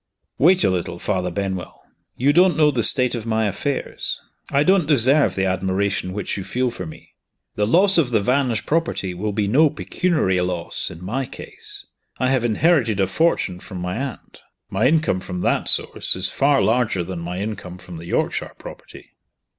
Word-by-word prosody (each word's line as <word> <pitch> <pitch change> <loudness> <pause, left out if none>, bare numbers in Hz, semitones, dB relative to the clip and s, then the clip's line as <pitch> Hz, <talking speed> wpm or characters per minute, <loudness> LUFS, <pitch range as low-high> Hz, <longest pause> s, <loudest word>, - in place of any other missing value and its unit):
"Wait 180 +5 +5
a - - +3
little, 90 -1 -3
Father 90 -1 -2
Benwell! 95 0 -4 0.4
You 140 +4 +3
don't 180 +2 +4
know 150 -1 +4
the 125 -4 0
state 125 +2 +5
of 115 -2 -4
my 110 0 +1
affairs. 130 +8 -3 0.3
I 140 +1 +2
don't 185 -2 +3
deserve 135 - +4
the 95 - 0
admiration 95 0 -1
which 100 +1 -4
you 95 - -4
feel 125 +4 -1
for 90 -6 -7
me. 80 - -13 0.4
The 105 0 0
loss 190 - +5
of 145 -7 +2
the 115 -3 +2
Vange 125 0 0
property 155 - -1
will 105 +4 -3
be 100 0 -1
no 150 +9 +4
pecuniary 150 - 0
loss, 90 -1 -2
in 85 +2 -10
my 130 +6 -2
case. - - -7 0.3
I 130 - +1
have 130 -3 +1
inherited 120 - +2
a 95 - +3
fortune 95 - 0
from 95 - -9
my 90 +1 -3
aunt. 135 -1 -7 0.3
My 105 +6 +2
income 155 - +2
from 90 -1 -6
that - - 0
source - - +2
is 95 +1 0
far 140 0 +2
larger 110 -5 +1
than 85 0 -6
my 90 +2 -5
income 95 -3 -5
from 90 -2 -11
the 85 +1 -9
Yorkshire - - -2
property." - - -12
110 Hz, 185 wpm, -21 LUFS, 95-140 Hz, 0.4 s, Wait